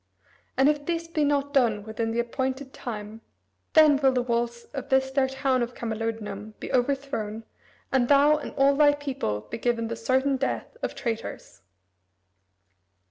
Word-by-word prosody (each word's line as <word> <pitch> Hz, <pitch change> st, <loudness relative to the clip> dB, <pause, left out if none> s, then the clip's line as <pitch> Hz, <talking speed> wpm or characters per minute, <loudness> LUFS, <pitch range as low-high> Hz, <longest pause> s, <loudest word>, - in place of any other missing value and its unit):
And 270 Hz, -, +5 dB
if 295 Hz, -1 st, +1 dB
this 335 Hz, -1 st, -1 dB
be 320 Hz, -2 st, 0 dB
not 285 Hz, -1 st, +1 dB
done 230 Hz, -7 st, +2 dB
within 220 Hz, +1 st, -3 dB
the 225 Hz, -, -2 dB
appointed 260 Hz, +3 st, -2 dB
time, 215 Hz, -1 st, -7 dB, 0.5 s
then 310 Hz, -3 st, +7 dB
will 270 Hz, -1 st, +4 dB
the 250 Hz, -1 st, +1 dB
walls 235 Hz, -1 st, -1 dB
of 275 Hz, -1 st, -5 dB
this 265 Hz, -1 st, +2 dB
their 265 Hz, -1 st, +2 dB
town 265 Hz, -1 st, 0 dB
of 240 Hz, +1 st, -3 dB
Camalodunum 220 Hz, -2 st, -4 dB
be -, -, -6 dB
overthrown, 250 Hz, -4 st, -1 dB, 0.5 s
and 255 Hz, -2 st, +3 dB
thou 290 Hz, +2 st, +5 dB
and 300 Hz, -, -6 dB
all 275 Hz, +1 st, +5 dB
thy 290 Hz, 0 st, +5 dB
people 260 Hz, -, -3 dB
be 230 Hz, -, -7 dB
given 230 Hz, -1 st, 0 dB
the 230 Hz, -, -3 dB
certain 265 Hz, +4 st, +1 dB
death 270 Hz, +1 st, -3 dB
of -, -, -3 dB
traitors." 225 Hz, -, -5 dB
260 Hz, 160 wpm, -26 LUFS, 230-280 Hz, 0.5 s, then